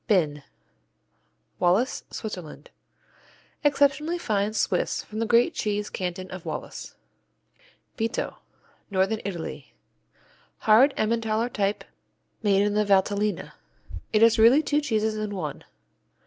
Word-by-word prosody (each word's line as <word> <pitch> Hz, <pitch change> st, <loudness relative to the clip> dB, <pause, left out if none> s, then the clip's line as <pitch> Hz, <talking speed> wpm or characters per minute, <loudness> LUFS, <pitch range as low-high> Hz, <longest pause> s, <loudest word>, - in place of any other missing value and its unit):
Binn 155 Hz, -9 st, +2 dB, 1.2 s
Wallis, 190 Hz, +9 st, +1 dB
Switzerland 180 Hz, -8 st, -7 dB, 0.9 s
Exceptionally 290 Hz, +3 st, +2 dB
fine 210 Hz, -9 st, 0 dB
Swiss -, -, 0 dB
from 215 Hz, -, -7 dB
the 225 Hz, -, 0 dB
great 235 Hz, +1 st, +4 dB
cheese 210 Hz, 0 st, -2 dB
canton 185 Hz, 0 st, -4 dB
of 185 Hz, -2 st, -7 dB
Wallis. -, -, -6 dB, 1.0 s
Bitto 225 Hz, +1 st, -2 dB, 0.5 s
Northern 195 Hz, +2 st, 0 dB
Italy 175 Hz, -5 st, -6 dB, 0.9 s
Hard 240 Hz, +6 st, +5 dB
Emmentaler 225 Hz, +1 st, 0 dB
type 200 Hz, -3 st, -1 dB, 0.6 s
made 200 Hz, -2 st, +3 dB
in 205 Hz, 0 st, +1 dB
the 210 Hz, 0 st, +2 dB
Valtellina. 205 Hz, +1 st, +1 dB, 0.6 s
It 215 Hz, +1 st, +4 dB
is 230 Hz, -1 st, +5 dB
really 245 Hz, +8 st, +6 dB
two 295 Hz, 0 st, +1 dB
cheeses 220 Hz, -5 st, 0 dB
in 210 Hz, -1 st, -3 dB
one. 155 Hz, -6 st, -5 dB
215 Hz, 110 wpm, -26 LUFS, 195-230 Hz, 1.2 s, really